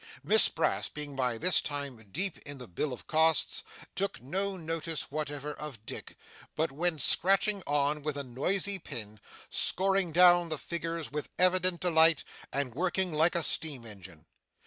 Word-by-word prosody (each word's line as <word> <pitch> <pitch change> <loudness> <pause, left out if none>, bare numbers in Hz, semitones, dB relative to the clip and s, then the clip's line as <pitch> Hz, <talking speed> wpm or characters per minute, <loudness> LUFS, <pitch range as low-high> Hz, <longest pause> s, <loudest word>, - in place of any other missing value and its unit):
Miss - - +5
Brass - - 0
being 150 -2 -5
by 125 -3 0
this 180 +6 +4
time 140 -3 -4 0.2
deep 190 - -3
in 145 -1 -9
the 125 -2 -8
bill 130 - -3
of 125 - -8
costs, 160 0 +2 0.3
took 195 0 -2
no 190 +9 -2
notice 165 -2 -3
whatever 150 -1 -4
of 135 -9 -9
Dick, - - -8 0.4
but 160 -1 0
went 160 +1 -1
scratching 195 +2 +3
on, 145 +1 +1
with 145 -1 -3
a 140 - -3
noisy 185 +10 -1
pen, 110 - -7 0.3
scoring 190 -2 +1
down 175 0 +6
the 155 - -2
figures 165 0 -4
with 150 0 -4
evident 185 -1 +2
delight, 160 -3 +4 0.3
and 135 -3 -2
working 180 +3 0
like 160 +3 +2
a 170 - +1
steam 145 -8 +2
engine. 95 -7 -12
155 Hz, 160 wpm, -30 LUFS, 140-175 Hz, 0.4 s, down